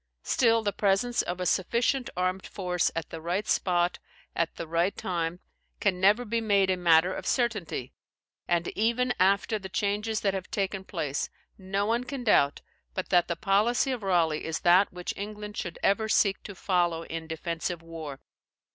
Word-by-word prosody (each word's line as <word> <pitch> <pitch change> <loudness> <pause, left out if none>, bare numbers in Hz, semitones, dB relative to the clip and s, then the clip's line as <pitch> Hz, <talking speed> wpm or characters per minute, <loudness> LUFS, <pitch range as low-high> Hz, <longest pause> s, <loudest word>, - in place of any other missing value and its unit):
Still, 230 -2 +3
the 205 -1 0
presence 210 +4 +2
of 175 +1 -4
a 180 - -2
sufficient 235 +8 +1
armed 185 +1 -1
force 180 -3 0
at 165 -2 -4
the 165 - -6
right 180 +6 -2
spot, 175 -1 +1 0.4
at 165 0 -1
the - - -5
right 170 +4 0
time, 170 -1 -2 0.4
can 185 -3 +1
never 210 +6 +4
be 230 +1 -1
made 200 -3 +3
a - - +2
matter 175 0 +4
of - - -6
certainty; 210 - -1 0.5
and 170 -1 +1
even 235 +4 +1
after 200 +3 +3
the 190 -1 -8
changes 210 +3 -1
that 195 -2 +1
have 190 -1 -5
taken 195 -1 -2
place, 150 -7 -2 0.3
no 195 +1 -2
one 230 +3 +1
can 255 0 -5
doubt 145 -10 +3 0.3
but 185 - -3
that 175 -2 +4
the 170 - -1
policy 215 - +2
of 250 -3 -3
Raleigh 170 -5 +1
is 160 0 -3
that 180 +3 +5
which 180 0 -5
England 210 +1 -6
should 175 - -4
ever 220 +2 +2
seek 200 -3 +3
to 205 - -7
follow 175 -3 0
in 165 -1 -6
defensive 165 +1 -4
war. 160 -4 -7
190 Hz, 175 wpm, -28 LUFS, 170-210 Hz, 0.5 s, that